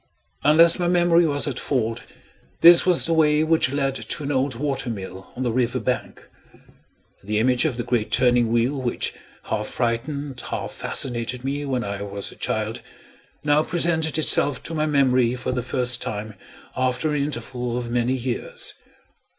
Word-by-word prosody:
Unless 165 Hz, +4 st, +5 dB
my 175 Hz, -, +1 dB
memory 175 Hz, -1 st, +4 dB
was 145 Hz, 0 st, -1 dB
at 135 Hz, -3 st, -3 dB
fault, 115 Hz, -5 st, -1 dB, 0.6 s
this 170 Hz, +2 st, +8 dB
was 180 Hz, -2 st, +4 dB
the 165 Hz, -, +1 dB
way 155 Hz, -1 st, +3 dB
which 160 Hz, -4 st, +2 dB
led 140 Hz, -1 st, 0 dB
to 140 Hz, -, -5 dB
an 140 Hz, -, -2 dB
old 130 Hz, -1 st, 0 dB
water 135 Hz, -1 st, -2 dB
mill 95 Hz, -3 st, -7 dB
on 130 Hz, -, -3 dB
the 120 Hz, -, 0 dB
river 125 Hz, +1 st, 0 dB
bank. 125 Hz, 0 st, -4 dB, 1.0 s
The 105 Hz, +2 st, -2 dB
image 125 Hz, +5 st, +2 dB
of 135 Hz, -6 st, -1 dB
the 120 Hz, -, -2 dB
great 115 Hz, -3 st, -1 dB
turning 120 Hz, -2 st, +3 dB
wheel, 120 Hz, +4 st, +1 dB
which 120 Hz, -2 st, -2 dB, 0.3 s
half 105 Hz, -1 st, -3 dB
frightened 130 Hz, +3 st, -3 dB
half -, -, -4 dB
fascinated 120 Hz, 0 st, -2 dB
me 140 Hz, +2 st, -3 dB
when 130 Hz, -3 st, -1 dB
I 100 Hz, -2 st, -5 dB
was 100 Hz, 0 st, -4 dB
a -, -, -13 dB
child, -, -, -3 dB, 0.6 s
now 150 Hz, 0 st, +3 dB
presented 160 Hz, -2 st, 0 dB
itself 145 Hz, -4 st, +3 dB
to 165 Hz, -, -5 dB
my 155 Hz, -1 st, 0 dB
memory 130 Hz, -4 st, +2 dB
for 125 Hz, 0 st, -3 dB
the 125 Hz, 0 st, -1 dB
first 125 Hz, 0 st, 0 dB
time 105 Hz, +1 st, -4 dB, 0.4 s
after 130 Hz, +4 st, 0 dB
an 145 Hz, -, 0 dB
interval 125 Hz, -3 st, -4 dB
of 120 Hz, -1 st, -4 dB
many 120 Hz, +2 st, +1 dB
years. 125 Hz, -1 st, -2 dB
130 Hz, 170 wpm, -23 LUFS, 120-150 Hz, 1.0 s, this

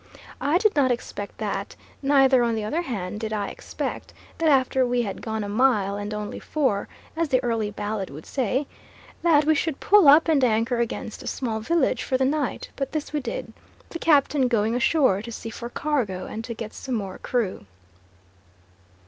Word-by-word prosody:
I 290 Hz, +6 st, +3 dB
did 425 Hz, +2 st, +2 dB
not 275 Hz, -3 st, +3 dB
expect 220 Hz, -4 st, -4 dB
that; 205 Hz, -2 st, -3 dB, 0.3 s
neither, 270 Hz, -2 st, +5 dB
on 235 Hz, -1 st, +1 dB
the 220 Hz, -, -2 dB
other 300 Hz, +11 st, -1 dB
hand, 210 Hz, -, -4 dB
did 220 Hz, -1 st, -4 dB
I 205 Hz, -2 st, -2 dB
expect -, -, -6 dB, 0.2 s
that 325 Hz, -1 st, +3 dB
after 265 Hz, -2 st, +3 dB
we 245 Hz, -1 st, +1 dB
had 200 Hz, -3 st, -5 dB
gone 220 Hz, -1 st, -3 dB
a -, -, -4 dB
mile 210 Hz, -3 st, +2 dB
and 205 Hz, +1 st, -4 dB
only 210 Hz, -1 st, -4 dB
four, 260 Hz, -10 st, 0 dB, 0.3 s
as 330 Hz, -1 st, 0 dB
the 255 Hz, -, +3 dB
early 225 Hz, -3 st, 0 dB
ballad 205 Hz, -1 st, -4 dB
would 150 Hz, +3 st, -10 dB
say, 260 Hz, +2 st, -1 dB, 0.6 s
that 305 Hz, -4 st, +4 dB
we 315 Hz, -, +5 dB
should 310 Hz, -1 st, -1 dB
pull 405 Hz, -6 st, +5 dB
up 300 Hz, +4 st, +7 dB
and 300 Hz, -5 st, +3 dB
anchor 230 Hz, +1 st, +2 dB
against 230 Hz, -2 st, -3 dB
a -, -, -8 dB
small 225 Hz, -4 st, -2 dB
village 265 Hz, +1 st, +1 dB
for 260 Hz, -, 0 dB
the 260 Hz, -, +2 dB
night; 285 Hz, 0 st, -1 dB
but 275 Hz, 0 st, -4 dB
this 310 Hz, -1 st, -3 dB
we 300 Hz, -, +1 dB
did, 230 Hz, -3 st, -5 dB, 0.4 s
the 335 Hz, -, -6 dB
captain 285 Hz, -4 st, +3 dB
going 225 Hz, -2 st, +1 dB
ashore 250 Hz, -, +3 dB
to 235 Hz, +2 st, -8 dB
see 225 Hz, 0 st, -6 dB
for 235 Hz, +2 st, -7 dB
cargo, 240 Hz, -11 st, -1 dB
and 225 Hz, -, -6 dB
to 235 Hz, -, -5 dB
get 220 Hz, -1 st, -7 dB
some 260 Hz, -2 st, -4 dB
more 195 Hz, -4 st, -4 dB
crew. 205 Hz, -, -2 dB
245 Hz, 190 wpm, -24 LUFS, 215-280 Hz, 0.6 s, up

